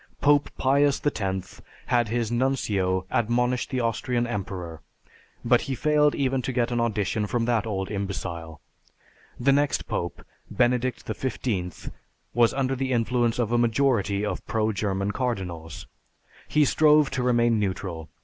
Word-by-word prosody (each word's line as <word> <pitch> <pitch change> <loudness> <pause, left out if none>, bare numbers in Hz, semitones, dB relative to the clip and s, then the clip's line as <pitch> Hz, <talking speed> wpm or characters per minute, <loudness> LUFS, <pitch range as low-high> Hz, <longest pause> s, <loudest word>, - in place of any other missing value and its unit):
Pope 145 0 +3
Pius 140 +1 +3
X 95 -9 -2 0.2
had 120 -2 +2
his 115 0 -1
Nuncio 105 -8 0
admonish 125 +2 +1
the 130 -2 -2
Austrian 120 +1 0
emperor, 90 -7 -5 0.6
but - - +4
he 135 - -1
failed 150 +2 +3
even 135 -1 0
to 130 - -3
get 120 -1 0
an 120 - 0
audition 105 -2 0
from 115 +2 0
that 115 -2 +1
old 95 -2 -3
imbecile. 90 -5 -5 0.8
The 135 +3 +3
next 145 +1 +1
Pope, 85 -3 -4 0.2
Benedict 125 0 0
XV, 105 -8 -3 0.4
was 120 -1 +4
under 135 -1 0
the 130 0 -2
influence 120 -1 +1
of 120 -2 0
a 120 - +3
majority 115 -4 +1
of 105 - -3
pro 110 -1 +1
German 100 -1 -1
cardinals. 90 - -4 0.6
He 150 -1 +3
strove 150 0 +4
to 130 - -1
remain 120 -2 +3
neutral. 95 -5 -3
120 Hz, 140 wpm, -25 LUFS, 100-130 Hz, 0.8 s, but